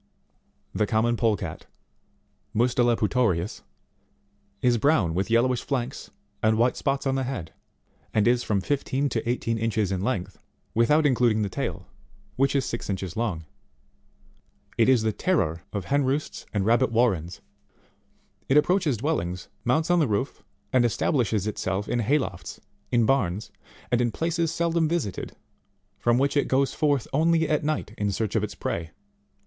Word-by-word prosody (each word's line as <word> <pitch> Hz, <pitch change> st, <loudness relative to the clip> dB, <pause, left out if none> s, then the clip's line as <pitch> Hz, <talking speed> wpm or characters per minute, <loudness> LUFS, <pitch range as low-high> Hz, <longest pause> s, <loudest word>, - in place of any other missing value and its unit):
19. -, -, -5 dB
The 105 Hz, -, +2 dB
common 115 Hz, +2 st, +2 dB
Polecat, 105 Hz, -8 st, -1 dB, 0.9 s
Mustela 120 Hz, 0 st, +3 dB
Putorivs, 105 Hz, -4 st, 0 dB, 1.0 s
is 120 Hz, -2 st, +3 dB
brown 110 Hz, -, +3 dB
with 95 Hz, +5 st, -1 dB
yellowish 120 Hz, +2 st, +2 dB
flanks 125 Hz, -4 st, -3 dB, 0.3 s
and 110 Hz, 0 st, +3 dB
white 120 Hz, +2 st, +3 dB
spots 135 Hz, -1 st, -1 dB
on 135 Hz, -, +1 dB
the 135 Hz, -, 0 dB
head, 125 Hz, -11 st, -5 dB, 0.6 s
and 110 Hz, +1 st, +2 dB
is 120 Hz, 0 st, +3 dB
from 100 Hz, -4 st, 0 dB
fifteen 140 Hz, +2 st, -1 dB
to 115 Hz, -1 st, -2 dB
eighteen 115 Hz, -2 st, -1 dB
inches 110 Hz, -3 st, 0 dB
in 95 Hz, -1 st, -1 dB
length, 95 Hz, -5 st, -2 dB, 0.3 s
without 150 Hz, +7 st, +3 dB
including 120 Hz, -5 st, +3 dB
the 100 Hz, -, -2 dB
tail, -, -, -4 dB, 0.5 s
which 135 Hz, +2 st, +2 dB
is 135 Hz, -2 st, +2 dB
six 115 Hz, -, -5 dB
inches 95 Hz, -2 st, -3 dB
long. 100 Hz, -9 st, -2 dB, 1.3 s
It -, -, +3 dB
is 125 Hz, -4 st, +4 dB
the 110 Hz, -, +1 dB
terror 85 Hz, -, 0 dB
of 100 Hz, -4 st, -4 dB
hen 140 Hz, +5 st, +2 dB
roosts 135 Hz, +3 st, -2 dB
and 100 Hz, -2 st, -1 dB
rabbit 120 Hz, +3 st, +3 dB
warrens. 95 Hz, -8 st, +1 dB, 1.1 s
It 135 Hz, -, +5 dB
approaches 160 Hz, -, +3 dB
dwellings, 95 Hz, -, -2 dB
mounts 155 Hz, +8 st, +1 dB
on 175 Hz, -, +4 dB
the 155 Hz, -, +3 dB
roofs, 110 Hz, +5 st, -2 dB, 0.3 s
and 130 Hz, -2 st, +5 dB
establishes 115 Hz, -, +1 dB
it 105 Hz, -, -3 dB
self 95 Hz, +2 st, -2 dB
in 120 Hz, -, 0 dB
hay 125 Hz, +7 st, +3 dB
lofts, 95 Hz, -11 st, -5 dB, 0.3 s
in 120 Hz, -2 st, +3 dB
barns, 110 Hz, -6 st, 0 dB, 0.4 s
and 120 Hz, 0 st, +3 dB
in 120 Hz, -, +2 dB
places 165 Hz, +2 st, -1 dB
seldom 165 Hz, -1 st, +1 dB
visited, 155 Hz, -, -3 dB, 0.6 s
from 120 Hz, 0 st, +2 dB
which 140 Hz, +2 st, +1 dB
it 145 Hz, -, +2 dB
goes 135 Hz, +1 st, +1 dB
forth 145 Hz, -5 st, +1 dB
only 160 Hz, +2 st, +3 dB
at 150 Hz, -1 st, +1 dB
night 155 Hz, 0 st, -2 dB
in 105 Hz, -1 st, 0 dB
search 105 Hz, +2 st, -2 dB
of -, -, +2 dB
its -, -, -4 dB
prey. 80 Hz, -1 st, -3 dB
120 Hz, 160 wpm, -26 LUFS, 105-140 Hz, 1.3 s, It